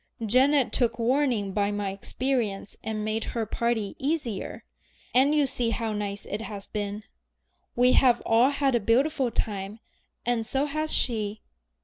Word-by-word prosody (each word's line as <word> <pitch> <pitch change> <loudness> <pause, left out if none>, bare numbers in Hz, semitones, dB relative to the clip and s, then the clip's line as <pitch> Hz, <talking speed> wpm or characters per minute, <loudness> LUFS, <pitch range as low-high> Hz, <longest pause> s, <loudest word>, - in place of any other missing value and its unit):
Janet 260 +4 +4
took 235 -2 +1
warning 240 -4 +1
by 200 +1 +1
my 205 -1 -2
experience 210 0 -2
and 215 -1 -3
made 215 +1 -1
her 230 -1 0
party 225 -2 -1
easier, 275 -7 -2 0.5
and 275 +4 +4
you 295 -1 +4
see 245 -3 -1
how 225 -1 -2
nice 205 -1 -4
it 205 +2 -4
has 205 -3 -6
been. 205 0 -4 0.7
We 250 +1 +5
have 245 -2 +5
all 230 +4 +5
had 280 -2 +1
a 240 - +3
beautiful 260 +5 +2
time, 205 -1 -3 0.5
and 240 -1 +1
so 270 +5 0
has 310 +1 -2
she. 215 -3 0
230 Hz, 150 wpm, -27 LUFS, 210-265 Hz, 0.7 s, We